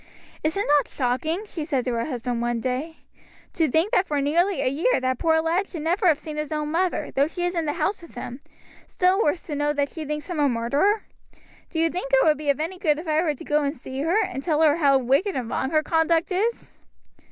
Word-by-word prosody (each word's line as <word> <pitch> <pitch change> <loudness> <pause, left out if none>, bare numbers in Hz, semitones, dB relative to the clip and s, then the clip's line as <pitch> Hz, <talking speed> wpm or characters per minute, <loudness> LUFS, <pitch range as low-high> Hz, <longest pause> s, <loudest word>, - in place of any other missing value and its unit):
"Is 315 +4 0
it 405 - 0
not 290 -1 +3
shocking," 285 - -1
she 340 -6 -5
said 275 -5 -1
to 250 - -1
her 230 0 -1
husband 245 -3 -3
one 240 0 -1
day, 260 +7 -3 0.6
"to 320 -3 +1
think 325 - +2
that 370 - +2
for 295 -1 0
nearly 340 +7 +1
a - - +1
year 315 - +2
that 255 -1 -1
poor 320 -1 +3
lad 350 +5 0
should 325 -4 -7
never 360 +4 +1
have 315 -4 +5
seen 305 0 -8
his 300 0 -3
own 300 -1 -2
mother, 360 +2 0
though 280 +2 +2
she 350 +2 -3
is 355 - -1
in 335 -2 -1
the 295 - -1
house 350 +5 -1
with 335 - -14
him, 245 +2 -7 0.5
still 370 +3 +2
worse 315 0 0
to 305 - -6
know 290 +1 0
that 285 -1 0
she 320 - -7
thinks 300 0 -4
him 350 -4 -4
a 290 -1 +3
murderer? 280 - +1 0.7
Do 330 - -6
you 330 0 +2
think 435 +8 -4
it - - +5
would 305 -1 +3
be 300 -1 -3
of 280 - +2
any 345 +4 -3
good 300 -5 +2
if 320 +2 -7
I 310 0 +2
were 310 -4 0
to - - -11
go 300 0 +1
and 285 +1 -1
see 260 +2 -6
her, 340 +8 +2
and 265 - -5
tell 310 +1 +1
her 305 0 +4
how 280 -4 +4
wicked 275 - +1
and 250 -3 -2
wrong 265 - -1
her 310 0 +2
conduct 325 +2 +1
is?" 430 +6 -1
310 Hz, 255 wpm, -24 LUFS, 280-345 Hz, 0.7 s, have